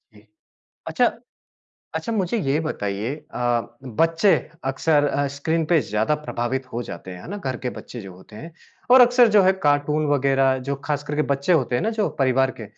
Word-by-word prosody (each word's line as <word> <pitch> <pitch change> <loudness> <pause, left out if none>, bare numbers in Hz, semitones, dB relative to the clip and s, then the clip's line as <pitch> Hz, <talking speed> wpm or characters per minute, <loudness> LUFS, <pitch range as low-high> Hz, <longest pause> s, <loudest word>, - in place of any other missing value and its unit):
इ 105 - -17 0.7
अच्छा, - - +2 0.9
अच्छा 160 +8 -3
मुझे 205 +1 0
ये 140 -6 0
बताइए 110 -6 -3 0.2
अ, 120 -1 -1
बच्चे 165 - +2 0.3
अक्सर 145 +3 +2
अ, 145 0 0
स्क्रीन 160 +3 0
पे 165 -3 +5
ज़्यादा 110 +3 0
प्रभावित 130 +2 -2
हो 120 - -3
जाते 95 -4 -9
हैं, 90 -1 -9
है - - -11
ना? 205 - -4
घर 135 -11 -4
के 125 - -1
बच्चे 120 - -9
जो 95 -3 -10
होते 95 +3 -15
हैं। 165 +9 -10 0.4
और 255 +1 +9
अक्सर 245 -1 +6
जो 205 - +7
है 190 0 +5
कार्टून 145 +1 +2
वगैरह 135 -1 +2
जो - - +1
खासकर 150 0 -3
के 150 - +2
बच्चे 140 +6 0
होते 130 -7 +1
हैं 120 - +1
ना 220 - 0
जो 210 - +2
परिवार 130 -1 +2
के, - - -6
140 Hz, 195 wpm, -22 LUFS, 120-165 Hz, 0.9 s, और